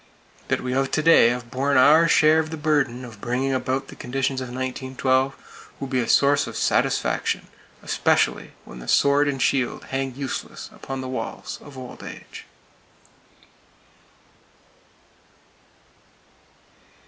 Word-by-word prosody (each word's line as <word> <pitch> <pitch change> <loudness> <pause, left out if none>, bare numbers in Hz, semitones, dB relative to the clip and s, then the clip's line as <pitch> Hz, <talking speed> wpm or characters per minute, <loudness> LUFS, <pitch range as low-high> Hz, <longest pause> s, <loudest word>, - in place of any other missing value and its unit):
That - - 0
we 125 0 -3
of 135 +1 +1
to 155 - +1
day 165 -7 +6
have 120 -1 -4
borne 140 +2 +1
our 150 +6 +6
share 155 -1 +5
of 155 -1 -2
the 160 - -5
burden 140 -5 0
of 110 -4 -12
bringing 130 +3 -1
about 130 +1 -2
the - - -10
conditions 135 +1 -2
of 130 - -5
1912, 130 +1 -2
will 135 - -4
be 130 -1 0
a 120 - -1
source 145 0 +4
of - - -6
satisfaction, - - 0 0.3
especially - - +1
when 60 - -11
the - - -11
sword 145 +1 +3
and 140 -2 -2
shield 130 -1 0
hang 135 -1 -2
useless 135 -1 -6
upon 135 -1 -6
the 130 - -5
walls 130 -3 -5
of 145 -2 -13
Old 130 -1 -9
Age. - - -10
135 Hz, 135 wpm, -23 LUFS, 130-140 Hz, 0.3 s, day